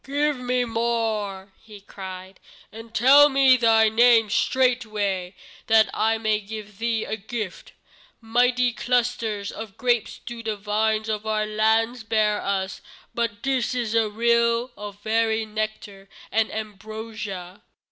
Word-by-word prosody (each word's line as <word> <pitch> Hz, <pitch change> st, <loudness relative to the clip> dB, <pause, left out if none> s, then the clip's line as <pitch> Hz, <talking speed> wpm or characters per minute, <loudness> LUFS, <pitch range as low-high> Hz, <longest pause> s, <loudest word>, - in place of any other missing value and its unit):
"Give 290 Hz, +2 st, 0 dB
me 250 Hz, 0 st, 0 dB
more," 220 Hz, -4 st, -2 dB
he 210 Hz, -2 st, -13 dB
cried, 190 Hz, -1 st, -10 dB, 0.3 s
"and 225 Hz, +1 st, -11 dB
tell 275 Hz, +6 st, +6 dB
me 270 Hz, -2 st, +5 dB
thy 225 Hz, -2 st, +4 dB
name 225 Hz, -1 st, +4 dB
straightway, 215 Hz, -8 st, 0 dB, 0.3 s
that 220 Hz, 0 st, +4 dB
I 225 Hz, +1 st, +1 dB
may 215 Hz, -1 st, 0 dB
give 210 Hz, -1 st, -9 dB
thee 230 Hz, -1 st, -1 dB
a -, -, -3 dB
gift. 215 Hz, -2 st, -6 dB, 0.5 s
Mighty 245 Hz, +2 st, +2 dB
clusters 230 Hz, -5 st, -1 dB
of 215 Hz, -3 st, -9 dB
grapes 240 Hz, -3 st, 0 dB
do 235 Hz, -1 st, -7 dB
the 220 Hz, -2 st, -3 dB
vines 215 Hz, +1 st, 0 dB
of 215 Hz, 0 st, -3 dB
our 215 Hz, 0 st, 0 dB
land 220 Hz, +2 st, 0 dB
bear 215 Hz, -1 st, +2 dB
for -, -, -7 dB
us, 190 Hz, -1 st, -2 dB, 0.3 s
but 230 Hz, -3 st, -3 dB
this 260 Hz, -2 st, 0 dB
is 235 Hz, -3 st, -2 dB
a 225 Hz, -2 st, +2 dB
rill 235 Hz, +2 st, +1 dB
of 205 Hz, -1 st, -9 dB
very 220 Hz, 0 st, +1 dB
nectar 215 Hz, -2 st, -5 dB, 0.2 s
and 220 Hz, 0 st, +1 dB
ambrosia." 215 Hz, -3 st, -7 dB
220 Hz, 135 wpm, -24 LUFS, 210-235 Hz, 0.5 s, tell